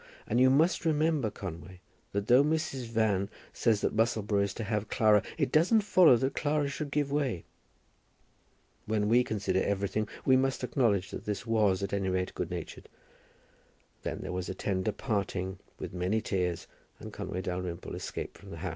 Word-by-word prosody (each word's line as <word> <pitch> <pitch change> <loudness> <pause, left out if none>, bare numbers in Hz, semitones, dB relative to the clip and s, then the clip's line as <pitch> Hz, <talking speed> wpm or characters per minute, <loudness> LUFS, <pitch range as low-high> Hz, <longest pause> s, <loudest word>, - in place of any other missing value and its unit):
And 120 +3 +1
you 130 - +7
must 155 +7 +3
remember, 155 -5 +2
Conway, 90 -2 -8 0.3
that 100 0 -2
though 125 +5 +6
Mrs. 150 -4 -1
Van 110 -4 +1 0.2
says 110 -3 +2
that - - 0
Musselboro 110 -2 +1
is 100 - 0
to 115 - -4
have 105 -1 -2
Clara, 105 -2 +4 0.2
it 145 -4 0
doesn't 185 +8 +4
follow 185 -8 +6
that 135 +3 -1
Clara 145 -1 0
should 145 +1 -4
give 145 -1 0
way." 135 - -1 1.4
When 105 -1 +1
we 120 +3 +5
consider 95 -4 -1
everything, 100 +1 -1 0.2
we 130 - +6
must 130 0 +1
acknowledge 105 -7 +1
that - - -7
this 100 -2 -3
was, 105 -4 +2
at 100 - -3
any 95 -1 0
rate, 90 0 -1
good - - -3
natured. - - -7 1.1
Then - - -4
there - - -5
was 90 -1 -3
a 95 - -4
tender 95 +2 -1
parting, 100 -3 -2 0.2
with - - -6
many 90 +4 0
tears, 90 -5 -2 0.3
and - - -9
Conway 95 +1 -4
Dalrymple 90 -1 -4
escaped - - -6
from 100 - -13
the 85 - -8
house. 90 +3 -3
105 Hz, 175 wpm, -30 LUFS, 95-130 Hz, 1.4 s, you